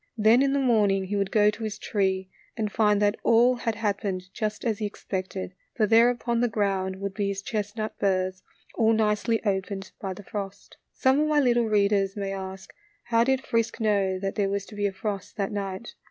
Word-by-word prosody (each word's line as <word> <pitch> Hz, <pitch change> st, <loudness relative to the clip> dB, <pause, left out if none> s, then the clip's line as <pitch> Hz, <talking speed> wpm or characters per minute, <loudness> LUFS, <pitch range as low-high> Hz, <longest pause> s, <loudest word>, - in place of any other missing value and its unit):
Then 220 Hz, +3 st, +5 dB
in 275 Hz, 0 st, +3 dB
the 280 Hz, -, +1 dB
morning 210 Hz, -7 st, +3 dB
he 195 Hz, +2 st, -3 dB
would 200 Hz, -1 st, 0 dB
go 210 Hz, -1 st, +4 dB
to 225 Hz, -, -8 dB
his 215 Hz, -1 st, -3 dB
tree 190 Hz, -3 st, -1 dB, 0.3 s
and 215 Hz, -2 st, -1 dB
find 210 Hz, -1 st, +3 dB
that 205 Hz, +1 st, +2 dB
all 235 Hz, +2 st, +5 dB
had 235 Hz, -2 st, -2 dB
happened 200 Hz, -3 st, -3 dB
just 215 Hz, 0 st, -3 dB
as 220 Hz, -3 st, 0 dB
he 215 Hz, -, -1 dB
expected, 190 Hz, -2 st, -5 dB, 0.2 s
for 220 Hz, -, +3 dB
there 230 Hz, +3 st, +6 dB
upon 240 Hz, -1 st, -1 dB
the 245 Hz, -, +3 dB
ground 195 Hz, -4 st, -1 dB
would 195 Hz, 0 st, -5 dB
be 205 Hz, 0 st, -1 dB
his 200 Hz, 0 st, -3 dB
chestnut 215 Hz, +1 st, -4 dB
burrs 185 Hz, -1 st, 0 dB, 0.3 s
all 225 Hz, 0 st, +3 dB
nicely 220 Hz, +1 st, +1 dB
opened 195 Hz, -1 st, -2 dB
by 190 Hz, -2 st, -4 dB
the 205 Hz, -, -11 dB
frost. 195 Hz, 0 st, -7 dB
Some 265 Hz, +2 st, +2 dB
of 305 Hz, -, +2 dB
my 305 Hz, -1 st, +3 dB
little 240 Hz, -3 st, +3 dB
readers 200 Hz, -1 st, +2 dB
may 195 Hz, -1 st, -2 dB
ask, 190 Hz, 0 st, -7 dB, 0.3 s
How 230 Hz, -1 st, +3 dB
did 265 Hz, +1 st, 0 dB
Frisk 230 Hz, 0 st, 0 dB
know 200 Hz, -4 st, +1 dB
that 195 Hz, +1 st, -3 dB
there 200 Hz, -2 st, 0 dB
was 200 Hz, 0 st, -2 dB
to 210 Hz, -, -12 dB
be 205 Hz, 0 st, +1 dB
a -, -, -3 dB
frost 195 Hz, +1 st, -5 dB
that 200 Hz, 0 st, -1 dB
night 200 Hz, +1 st, -5 dB
205 Hz, 210 wpm, -26 LUFS, 195-225 Hz, 0.3 s, there